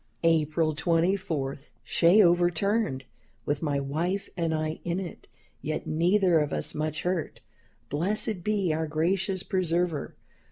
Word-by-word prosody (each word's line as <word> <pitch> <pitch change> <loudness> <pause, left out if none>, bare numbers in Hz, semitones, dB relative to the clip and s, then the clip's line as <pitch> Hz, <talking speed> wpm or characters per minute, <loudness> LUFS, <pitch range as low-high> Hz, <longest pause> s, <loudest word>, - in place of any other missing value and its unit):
"April 160 -1 +2
24. 165 -3 0 0.3
Shay 180 +5 +5
overturned, 175 - +2 0.4
with 145 0 -1
my 145 -3 0
wife 165 +8 -2
and 165 -2 -1
I 155 0 -2
in 175 +1 -1
it, 180 -4 -8 0.3
yet 155 +1 -3
neither 175 +2 +3
of 150 -1 -1
us - - -3
much 155 0 -3
hurt. 180 -3 -2 0.5
Blessed 190 - -1
be 200 -5 +1
our 160 +1 -1
gracious 185 +4 0
Preserver! 175 -5 -1
170 Hz, 125 wpm, -27 LUFS, 155-185 Hz, 0.5 s, Shay